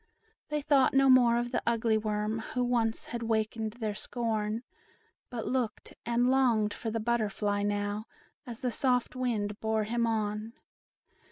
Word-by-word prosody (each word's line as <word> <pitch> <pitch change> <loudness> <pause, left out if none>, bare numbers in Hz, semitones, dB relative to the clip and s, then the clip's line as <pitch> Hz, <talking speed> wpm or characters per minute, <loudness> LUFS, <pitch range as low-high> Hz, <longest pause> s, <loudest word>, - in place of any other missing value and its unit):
They 300 -1 -1
thought 275 -2 +4
no 270 -1 +6
more 240 -2 +6
of 240 0 -2
the - - 0
ugly 230 -1 +2
worm, 215 0 -1 0.2
Who 250 - +2
once 235 -2 +1
had 235 - -3
wakened 220 -1 -1
their 220 -3 -3
scorn; 220 0 -2 0.7
But 240 -3 -4
looked 250 -3 -2
and 240 +1 +2
longed 235 -6 +3
for 225 - -4
the 225 +1 -2
butterfly 215 -3 0
now, 205 +1 -1 0.4
As 235 -1 -7
the 250 - +1
soft 250 0 +1
wind 215 -5 -1
bore 220 0 0
him 235 +2 0
on. 215 0 -2
225 Hz, 155 wpm, -30 LUFS, 215-245 Hz, 0.7 s, no